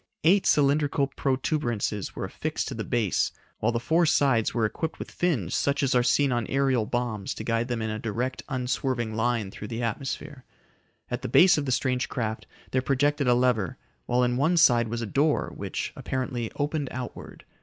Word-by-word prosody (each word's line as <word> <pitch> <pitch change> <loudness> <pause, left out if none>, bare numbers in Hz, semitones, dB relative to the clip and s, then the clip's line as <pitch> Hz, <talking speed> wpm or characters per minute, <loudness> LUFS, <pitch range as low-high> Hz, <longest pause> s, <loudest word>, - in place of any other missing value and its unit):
Eight 190 +5 +4
cylindrical 145 0 +3
protuberances 130 - -1
were - - -3
affixed - - -3
to - - -4
the - - -4
base 115 -6 0 0.3
while 110 - +1
the 115 - -1
four 165 +7 +2
sides 130 -7 +3
were 115 -2 +1
equipped 160 +9 -3
with - - -7
fins 130 - 0
such 140 +1 +1
as 135 - +2
are 125 - +4
seen 140 +2 +3
on 120 -2 0
aerial 135 -5 +1
bombs 120 -5 -2
to - - -6
guide 115 +1 0
them 120 -3 -2
in 110 - -2
a 110 - -3
direct, 120 +4 -3
unswerving 125 -3 -1
line 115 -3 0
through 105 - -8
the 115 +2 -4
atmosphere. 130 +3 -4 0.7
At - - -2
the - - -3
base 180 0 +7
of 145 -2 -2
the - - 0
strange 125 0 0
craft 110 -3 -3 0.2
there 130 - +2
projected 140 +1 +1
a 120 - +5
lever, 120 -7 +1 0.3
while 125 +1 +2
in 125 0 +1
one 160 +6 +2
side 120 -7 +5
was 115 +1 -3
a - - -2
door 145 +8 +1
which, - - -4
apparently 125 -3 -3
opened 145 0 -1
outward. 125 -1 -8
125 Hz, 190 wpm, -26 LUFS, 115-140 Hz, 0.7 s, base